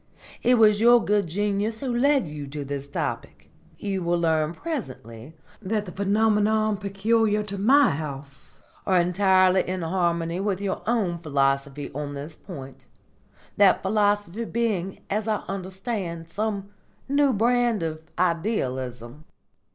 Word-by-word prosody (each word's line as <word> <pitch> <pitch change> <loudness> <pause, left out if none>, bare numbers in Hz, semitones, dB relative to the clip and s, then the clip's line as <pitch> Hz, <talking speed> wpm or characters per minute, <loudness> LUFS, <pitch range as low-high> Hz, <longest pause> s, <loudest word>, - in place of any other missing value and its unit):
It 250 - +4
was 215 -2 +5
your 240 0 +6
good 205 -2 +2
genius 205 +5 -1
who 255 -3 -2
led 275 - +3
you 150 -1 -7
to 145 +1 -6
this 140 0 -5
topic. - - -5 0.3
You 195 -2 -3
will 175 0 +1
learn 160 -1 +1
presently 135 - -7 0.2
that 210 +1 -2
the 180 - -8
phenomena 215 +2 +2
peculiar 210 +2 +1
to 200 -1 -5
my 270 +6 +5
house 140 -2 -7 0.2
are 185 -2 +4
entirely 185 +1 +4
in 185 -1 -2
harmony 170 0 0
with 195 -1 -1
your 200 -1 -3
own 200 -8 0
philosophy 140 -2 -1
on 145 0 -5
this 145 +3 -7
point, 135 -8 -11 0.7
that 200 -2 +5
philosophy 205 0 +1
being, 210 -6 -2
as 210 +2 -2
I 215 -1 -1
understand, 190 -3 -5
some 200 0 -3 0.4
new 280 0 +3
brand 240 -2 +2
of 155 -1 -4 0.2
Idealism." 135 - -2
190 Hz, 135 wpm, -25 LUFS, 160-215 Hz, 0.7 s, your